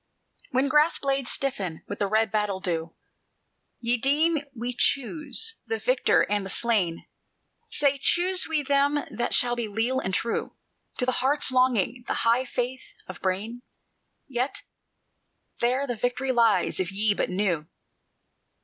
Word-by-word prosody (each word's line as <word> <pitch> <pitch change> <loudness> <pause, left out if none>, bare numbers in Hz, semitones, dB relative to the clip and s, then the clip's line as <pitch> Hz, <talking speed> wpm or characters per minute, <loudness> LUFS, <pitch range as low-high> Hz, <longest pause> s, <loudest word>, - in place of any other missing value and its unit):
"When 265 +2 +1
grass 300 +4 +3
blades 275 -2 0
stiffen 195 -12 -2
with 205 - -6
red 215 +2 +1
battle 210 -3 -1
dew, 165 -3 -3 0.8
Ye 240 +1 +2
deem 300 +6 +3 0.2
we 240 +2 -4
choose 310 - 0
the 450 - -1
victor - - +2
and 205 -1 -1
the 195 - -6
slain: 195 -6 +1 0.6
Say, 280 -1 +2
choose 365 +3 +3
we 310 -2 0
them 285 +1 +1
that 240 - -1
shall 240 -1 +3
be 235 -2 -3
leal 225 +5 -1
and 190 - -3
true 230 +4 -2 0.4
To 250 - 0
the 255 - +1
heart's 270 +1 +3
longing, 250 -2 +1
the - - -1
high 235 +3 +3
faith 250 +1 -4
of 185 - -10
brain? 205 +6 -2 0.7
Yet 255 0 -3 1.0
there 255 +4 +1
the 245 -4 -4
victory 245 +3 -1
lies, 230 -7 +2
if 185 0 -1
ye 205 +2 +2
but - - -2
knew. 180 -5 -1
245 Hz, 145 wpm, -26 LUFS, 205-275 Hz, 1.0 s, grass